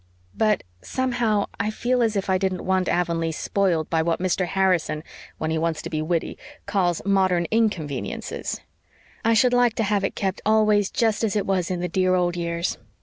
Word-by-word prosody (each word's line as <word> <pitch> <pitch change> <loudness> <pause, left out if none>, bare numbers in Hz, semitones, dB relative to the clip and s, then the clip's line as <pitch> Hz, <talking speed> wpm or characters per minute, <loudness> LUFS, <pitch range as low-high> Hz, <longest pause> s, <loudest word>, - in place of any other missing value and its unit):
But 215 -2 +2 0.2
somehow 240 -5 0
I 205 +1 0
feel 245 +3 0
as 225 -2 +1
if 195 -1 -1
I 190 -1 +2
didn't 190 -1 -2
want 190 -1 +1
Avonlea 170 -2 0
spoiled 170 -1 0
by 165 -1 +3
what 165 0 0
Mr. 185 0 0
Harrison, 175 -5 +1 0.3
when 155 - -2
he 160 - 0
wants 165 -1 -1
to - - -6
be 155 -1 -1
witty, 165 +1 -2 0.3
calls 190 -4 0
'modern 190 -3 +2
inconveniences.' 185 - -2 0.6
I 230 0 +3
should 250 +2 +4
like 245 -2 +3
to 225 - 0
have 205 -1 +1
it 195 - -1
kept 190 -1 -2
always 215 -2 +3
just 225 -1 +1
as 220 -2 0
it 205 - +1
was 185 -3 0
in 180 -1 -2
the 180 - -1
dear 185 +1 +2
old 175 -1 +1
years. 170 0 -2
190 Hz, 190 wpm, -24 LUFS, 170-215 Hz, 0.6 s, should